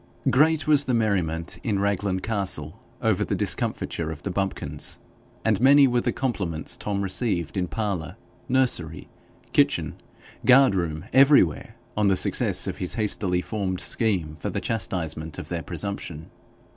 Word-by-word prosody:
Great 155 +2 +3
was 145 -2 +4
the 125 - +1
merriment 90 -7 -1
in 105 -4 -1
Raglan 100 -1 0
Castle 100 -3 -3 0.2
over - - +2
the - - -1
discomfiture 80 -1 -2
of 80 -1 -7
the 100 - -3
bumpkins, 90 -7 -2 0.5
and 110 -1 +2
many 140 +2 +7
were 120 -1 +1
the - - 0
compliments 95 -12 -3
Tom 100 -1 -3
received 95 - -1
in 90 -2 0
parlour, 100 -6 -3 0.3
nursery, 120 -12 +1 0.4
kitchen, - - +1 0.4
guard 130 -2 +6
room, 85 -2 -2
everywhere, 135 - +4 0.2
on 105 -1 +2
the 95 -1 +3
success - - +1
of - - -4
his 90 - -1
hastily 100 -5 0
formed 95 -4 -3
scheme 90 -9 0
for 75 - -4
the - - -2
chastisement 80 -8 -3
of - - -7
their 85 -1 -3
presumption. 85 -3 -5
100 Hz, 145 wpm, -25 LUFS, 85-115 Hz, 0.5 s, many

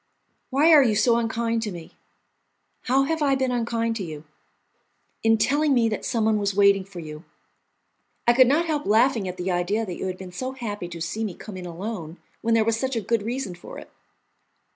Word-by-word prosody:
"Why 290 +5 +4
are 300 - +9
you 230 -5 +2
so 230 +3 +3
unkind 230 0 -1
to 215 -2 -3
me?" 170 -3 -9 0.9
"How 265 +2 +3
have 320 +3 -1
I 275 -2 +3
been 260 -1 0
unkind 230 -1 -1
to 200 - -4
you?" 155 -3 -7 1.0
"In 225 0 +4
telling 290 +5 +2
me 235 -2 +3
that 215 - -4
someone 220 -3 +1
was 200 -1 -1
waiting 200 -1 +4
for 190 -2 -10
you." 155 -1 -8 1.0
"I 240 - +7
could 255 +1 +6
not 305 +6 +2
help 305 -3 -2
laughing 225 -1 +3
at 180 0 -5
the 180 +1 -2
idea 185 +6 0
that 180 -4 -6
you - - -3
had 185 -1 -4
been 185 -1 -9
so 255 +8 -4
happy 210 -8 -5
to 170 -1 -8
see 210 +7 -3
me 200 -6 -4
come 210 - -10
in 180 -1 -7
alone 175 -2 -6 0.2
when 230 0 +2
there 225 -1 +3
was 225 0 +1
such 265 0 -2
a - - +1
good 225 +1 0
reason 235 -2 -3
for 175 - -11
it." - - -11
225 Hz, 210 wpm, -24 LUFS, 185-250 Hz, 1.0 s, are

